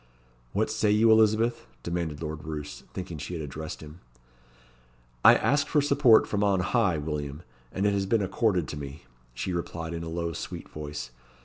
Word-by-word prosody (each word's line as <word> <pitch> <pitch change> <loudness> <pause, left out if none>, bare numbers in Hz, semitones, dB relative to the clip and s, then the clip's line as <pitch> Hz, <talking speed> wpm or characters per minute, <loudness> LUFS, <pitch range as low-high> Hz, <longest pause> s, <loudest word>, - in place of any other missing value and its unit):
"What 110 +1 +1
say 110 -1 +1
you, 110 +2 +5
Elizabeth?" 110 +2 +3 0.2
demanded 85 -3 -3
Lord 75 0 -5
Roos, 75 -1 -6
thinking 90 -4 -6
she 80 +5 -5
had 80 - -4
addressed 75 +3 -6
him. 75 +3 -11 1.2
"I - - +9
asked 145 0 +2
for 150 - +3
support 140 -5 +5
from 105 -1 -1
on 100 -2 +3
High, 95 -3 +2
William, 75 0 -4 0.3
and 95 - -1
it 100 - +3
has 100 -1 0
been 110 0 +2
accorded 95 -3 +1
to 75 - -5
me," 70 +1 -8 0.3
she 90 +9 -3
replied 85 -1 -4
in 85 - -4
a 85 - -5
low 85 0 -2
sweet - - -6
voice. 75 -5 -6
85 Hz, 180 wpm, -27 LUFS, 75-110 Hz, 1.2 s, I